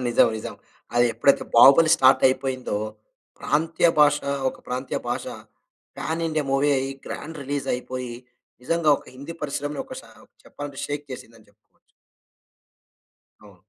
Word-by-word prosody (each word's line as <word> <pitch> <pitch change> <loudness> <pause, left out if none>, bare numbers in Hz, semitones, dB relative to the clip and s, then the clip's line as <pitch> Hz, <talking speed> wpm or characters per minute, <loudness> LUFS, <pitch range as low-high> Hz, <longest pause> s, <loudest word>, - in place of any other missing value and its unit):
నిజం. 120 -1 +4
నిజం. 110 - -6 0.4
అది 120 0 +4
ఎప్పుడైతే, 130 +5 +2
'బాహుబలి' 140 +7 +8
స్టార్టయిపోయిందో, 130 -2 +2 0.6
ప్రాంతీయ 165 +2 +1
భాష 150 0 +6 0.3
ఒక - - -7
ప్రాంతీయ 125 +1 -3
భాష, - - -2 0.7
పాన్ 165 +1 -3
ఇండియా 155 -1 -1
మూవీ 135 +2 +2
అయ్యి, 135 +1 -3
గ్రాండ్ 160 -1 -7
రిలీజయిపోయి, 130 -3 -4 0.5
నిజంగా 165 +2 +1
ఒక - - -18
హిందీ 145 +5 -8
పరిశ్రమలో 145 0 -3
ఒక - - -9
షా - - -17 0.3
చెప్పాలంటే, 145 -2 -8
షేక్ 145 0 -4
చేసిందని 115 -3 -12
చెప్పుకోచ్చు. 105 +1 -35 1.5
అవును. 105 -2 -16
135 Hz, 125 wpm, -24 LUFS, 125-150 Hz, 1.5 s, బాహుబలి